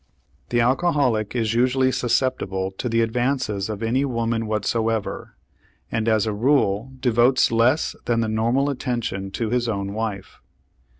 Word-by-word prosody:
The 120 Hz, -, +2 dB
alcoholic 130 Hz, -, +1 dB
is 115 Hz, -2 st, 0 dB
usually 130 Hz, +2 st, +2 dB
susceptible 115 Hz, -7 st, -1 dB
to 125 Hz, -, -2 dB
the 115 Hz, 0 st, +2 dB
advances 115 Hz, -3 st, -1 dB
of 105 Hz, 0 st, -4 dB
any 125 Hz, +5 st, +1 dB
woman 115 Hz, -3 st, -1 dB
whatsoever, 110 Hz, 0 st, -2 dB, 0.6 s
and 115 Hz, -1 st, -1 dB
as 110 Hz, -1 st, +2 dB
a 110 Hz, -, -1 dB
rule 115 Hz, -1 st, +1 dB
devotes 125 Hz, +1 st, +3 dB
less 120 Hz, +6 st, +2 dB
than 115 Hz, -1 st, +1 dB
the 110 Hz, -, 0 dB
normal 120 Hz, +6 st, +1 dB
attention 120 Hz, -7 st, -3 dB
to 115 Hz, 0 st, -2 dB
his 120 Hz, -1 st, 0 dB
own 100 Hz, -2 st, -3 dB
wife. 105 Hz, -3 st, -5 dB
115 Hz, 140 wpm, -23 LUFS, 110-125 Hz, 0.6 s, devotes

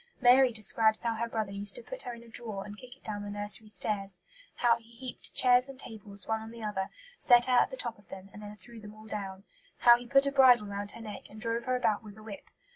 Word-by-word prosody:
Mary 255 Hz, +1 st, +6 dB
describes 220 Hz, 0 st, +3 dB
how 230 Hz, -1 st, 0 dB
her 230 Hz, +1 st, -3 dB
brother 220 Hz, -3 st, -3 dB
used 200 Hz, +1 st, -1 dB
to -, -, -8 dB
put -, -, -7 dB
her 245 Hz, -, -5 dB
in 235 Hz, -, -13 dB
a -, -, -16 dB
drawer 220 Hz, -4 st, -4 dB
and 205 Hz, +1 st, -9 dB
kick 255 Hz, 0 st, -13 dB
it -, -, -34 dB
down 205 Hz, -1 st, -4 dB
the 205 Hz, -, -6 dB
nursery 205 Hz, +1 st, -2 dB
stairs; 195 Hz, -1 st, -3 dB, 0.3 s
how 240 Hz, -1 st, +3 dB
he 230 Hz, -1 st, -21 dB
heaped 245 Hz, +2 st, -6 dB
chairs 250 Hz, +1 st, +4 dB
and 265 Hz, -1 st, -11 dB
tables 205 Hz, -5 st, -9 dB
one 220 Hz, 0 st, -1 dB
on 220 Hz, -, -9 dB
the 230 Hz, 0 st, -10 dB
other, 200 Hz, -3 st, -3 dB, 0.3 s
set 245 Hz, -1 st, +6 dB
her 255 Hz, -, 0 dB
at 245 Hz, -, +4 dB
the 260 Hz, -, -8 dB
top 235 Hz, -4 st, -4 dB
of 205 Hz, -, -21 dB
them, 190 Hz, 0 st, -10 dB
and 210 Hz, -, -11 dB
then 210 Hz, 0 st, -9 dB
threw 225 Hz, +3 st, -14 dB
them 210 Hz, 0 st, -12 dB
all 215 Hz, 0 st, -14 dB
down; 195 Hz, -3 st, -6 dB, 0.4 s
how 240 Hz, 0 st, +8 dB
he 240 Hz, 0 st, -7 dB
put 275 Hz, +3 st, +4 dB
a 280 Hz, -, 0 dB
bridle 255 Hz, -5 st, +6 dB
round 200 Hz, 0 st, -5 dB
her 230 Hz, -, -10 dB
neck 210 Hz, -2 st, -9 dB
and 215 Hz, -, -12 dB
drove 230 Hz, +1 st, -2 dB
her 255 Hz, -, 0 dB
about 220 Hz, -4 st, +1 dB
with 210 Hz, -1 st, -12 dB
a 215 Hz, -, -13 dB
whip. 215 Hz, -2 st, -10 dB
220 Hz, 270 wpm, -30 LUFS, 205-245 Hz, 0.4 s, how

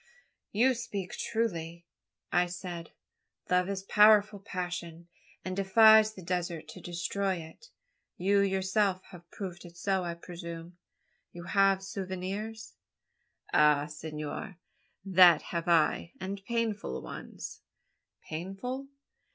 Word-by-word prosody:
"You 250 Hz, +5 st, +4 dB
speak 210 Hz, -6 st, -5 dB
truly," 170 Hz, -7 st, -3 dB, 0.5 s
I 175 Hz, 0 st, +3 dB
said. 175 Hz, -1 st, -6 dB, 0.6 s
"Love 180 Hz, +1 st, +3 dB
is 195 Hz, -1 st, -3 dB
a -, -, -26 dB
powerful 210 Hz, 0 st, +5 dB
passion, 175 Hz, -3 st, -5 dB, 0.4 s
and 185 Hz, 0 st, -3 dB
defies 215 Hz, +2 st, +6 dB
even 190 Hz, -, -11 dB
the -, -, -16 dB
desert 175 Hz, -3 st, -2 dB
to -, -, -10 dB
destroy 185 Hz, +3 st, -2 dB
it. 170 Hz, -, -11 dB, 0.5 s
You 200 Hz, +3 st, +3 dB
yourself 190 Hz, 0 st, +1 dB
have 175 Hz, -2 st, -13 dB
proved 180 Hz, -3 st, -7 dB
it 170 Hz, -1 st, -13 dB
so, 190 Hz, +1 st, 0 dB
I 170 Hz, -1 st, -3 dB
presume? 170 Hz, 0 st, -8 dB, 0.6 s
You 175 Hz, -, -8 dB
have 195 Hz, +1 st, +3 dB
souvenirs?" 195 Hz, +3 st, -5 dB, 0.8 s
"Ay, 150 Hz, -1 st, +5 dB
senor, 150 Hz, +3 st, -6 dB, 0.5 s
that 180 Hz, -4 st, +7 dB
have 170 Hz, -1 st, -4 dB
I; 165 Hz, 0 st, +2 dB
and 195 Hz, +2 st, -5 dB
painful 225 Hz, -, -2 dB
ones." -, -, -8 dB, 0.7 s
"Painful?" 195 Hz, +12 st, -5 dB
185 Hz, 120 wpm, -30 LUFS, 170-200 Hz, 0.8 s, that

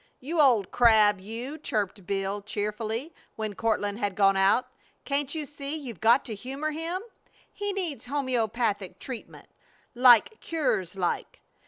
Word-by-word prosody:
"You 310 Hz, +5 st, 0 dB
old 235 Hz, -9 st, +4 dB
crab, 215 Hz, -4 st, +5 dB
you," 235 Hz, +9 st, -6 dB
chirped 205 Hz, -7 st, -3 dB
Bill, 195 Hz, +1 st, -2 dB
cheerfully, 215 Hz, +7 st, -3 dB, 0.2 s
when 215 Hz, -1 st, -4 dB
Courtland 205 Hz, -1 st, -1 dB
had 205 Hz, -4 st, -1 dB
gone 195 Hz, -1 st, +4 dB
out. 195 Hz, +6 st, +4 dB, 0.4 s
"Can't 285 Hz, +1 st, -1 dB
you 310 Hz, -2 st, -3 dB
see 285 Hz, +1 st, -5 dB
you've 255 Hz, -, -7 dB
got 235 Hz, +4 st, +4 dB
to 235 Hz, -, -5 dB
humor 270 Hz, +8 st, -4 dB
him? 335 Hz, +5 st, -3 dB, 0.5 s
He 410 Hz, 0 st, -2 dB
needs 350 Hz, -10 st, -3 dB
homeopathic 235 Hz, -7 st, -1 dB
treatment. 255 Hz, -4 st, -8 dB, 0.5 s
'Like 245 Hz, -, +6 dB
cures 235 Hz, -, -1 dB
like.' 180 Hz, -2 st, -2 dB
235 Hz, 140 wpm, -27 LUFS, 205-285 Hz, 0.5 s, Like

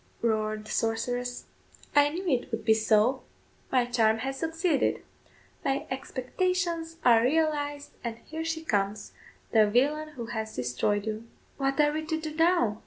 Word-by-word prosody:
roared 215 Hz, -1 st, 0 dB
the -, -, -8 dB
sorceress, 245 Hz, +2 st, -1 dB, 0.5 s
"I 290 Hz, 0 st, +6 dB
knew 360 Hz, +5 st, -5 dB
it 260 Hz, -5 st, +1 dB
would 225 Hz, -1 st, -3 dB
be 220 Hz, -, +6 dB
so; 220 Hz, +4 st, +3 dB, 0.5 s
my 250 Hz, -2 st, +3 dB
charm 225 Hz, -2 st, +3 dB
has 270 Hz, 0 st, -3 dB
succeeded; 325 Hz, -1 st, 0 dB, 0.6 s
my 275 Hz, -2 st, 0 dB
expectations 330 Hz, +5 st, -2 dB
are 230 Hz, -2 st, +7 dB
realised, 290 Hz, +1 st, 0 dB
and 230 Hz, -2 st, -4 dB
here 320 Hz, +1 st, -5 dB
she 325 Hz, 0 st, -3 dB
comes, 205 Hz, -5 st, -1 dB, 0.4 s
the 215 Hz, -2 st, +5 dB
villain 290 Hz, +7 st, +2 dB
who 240 Hz, -5 st, -6 dB
has 220 Hz, -1 st, -4 dB
destroyed 125 Hz, -, 0 dB
you." 220 Hz, +1 st, -4 dB, 0.3 s
"What 275 Hz, 0 st, 0 dB
are 295 Hz, 0 st, +5 dB
we 310 Hz, +1 st, -2 dB
to 320 Hz, 0 st, -1 dB
do 310 Hz, -1 st, -5 dB
now?" 325 Hz, -, +2 dB
255 Hz, 155 wpm, -28 LUFS, 220-310 Hz, 0.6 s, are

